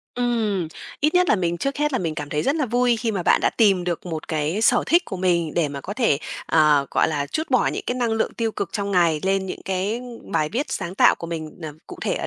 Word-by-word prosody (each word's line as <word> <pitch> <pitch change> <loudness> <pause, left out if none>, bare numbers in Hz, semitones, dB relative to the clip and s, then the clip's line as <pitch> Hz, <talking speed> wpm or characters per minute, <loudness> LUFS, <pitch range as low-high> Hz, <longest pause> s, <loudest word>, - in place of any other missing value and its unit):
Ừm, 220 -8 0 0.3
ít 300 +4 +2
nhất 360 0 +4
là - - +4
mình 175 -2 -1
trước 275 +1 -2
hết 295 -1 +1
là 255 - +1
mình 165 -3 -2
cảm 145 -1 -5
thấy 150 0 -1
rất 280 +4 +1
là 295 -5 0
vui 245 +1 +2
khi 225 0 -1
mà 190 -4 -2
bạn - - +4
đã - - +2
tìm 195 -6 +3
được 175 0 -3
một 160 -3 -5
cái 160 +5 -1
sở - - +4
thích 345 +1 +4
của 190 - -6
mình 170 -4 0
để 165 -4 +1
mà 140 -1 -6
có 200 - -6
thể, 220 - +2 0.3
à, 150 -3 +4
gọi - - +2
là, 145 -2 -1
trút 315 - -4
bỏ 255 - +3
những - - -2
cái 245 - -1
năng 240 -3 0
lượng 225 - -1
tiêu 225 -2 -1
cực 185 - -4
trong 200 -1 -2
ngày 170 -5 +3
lên 190 0 0
những - - -6
cái 195 +5 -1 0.2
bài 150 0 0
viết 265 - -2
sáng 185 -7 -4
tạo - - +5
của 170 - -8
mình, 160 +1 -6
ờ, 155 -2 -5
cụ - - -10
thể - - 0
ở - - -3
190 Hz, 275 wpm, -23 LUFS, 160-240 Hz, 0.3 s, tạo